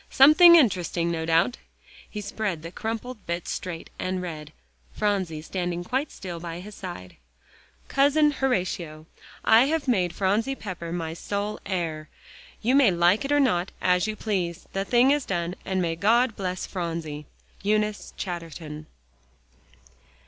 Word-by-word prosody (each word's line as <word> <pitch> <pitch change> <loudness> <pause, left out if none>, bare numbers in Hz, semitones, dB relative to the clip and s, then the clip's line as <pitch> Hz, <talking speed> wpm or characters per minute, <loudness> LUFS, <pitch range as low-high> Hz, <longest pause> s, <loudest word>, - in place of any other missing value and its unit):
Something 310 +6 +8
interesting, 180 - +2
no 160 -1 -3
doubt." 165 +9 +3 0.5
He 210 - -5
spread 200 -5 -3
the 165 - -7
crumpled 225 +2 -5
bit 170 0 -3
straight 170 -3 -5
and 185 0 -2
read, 155 -4 -6 0.4
Phronsie 190 -7 -1
standing 175 0 -3
quite 260 +10 -1
still 175 -3 -7
by 170 0 -6
his 205 +3 -10
side: 175 - -8 0.7
COUSIN 290 +2 +4
HORATIO: 180 - -2 0.4
I 225 +3 +7
have 310 0 -1
made 185 -8 +2
Phronsie 210 +7 +1
Pepper 180 -7 -6
my 165 -2 -3
sole 205 +4 -3
heir. 165 -5 -3 0.5
You 245 +4 +2
may 275 -5 +6
like 175 +6 +3
it 275 - -3
or 290 - +4
not, 180 -9 +2
as 180 +2 +2
you 215 - -2
please. 185 -6 -2
The 195 0 -1
thing 245 +5 +4
is 290 -1 +2
done, 175 -4 -2
and 190 0 -1
may 165 -1 -1
God 225 +6 +3
bless 185 -2 -3
Phronsie. 165 -5 -5 0.3
EUNICE 210 +1 -1
CHATTERTON. 165 -4 -6
185 Hz, 145 wpm, -26 LUFS, 170-225 Hz, 0.7 s, Something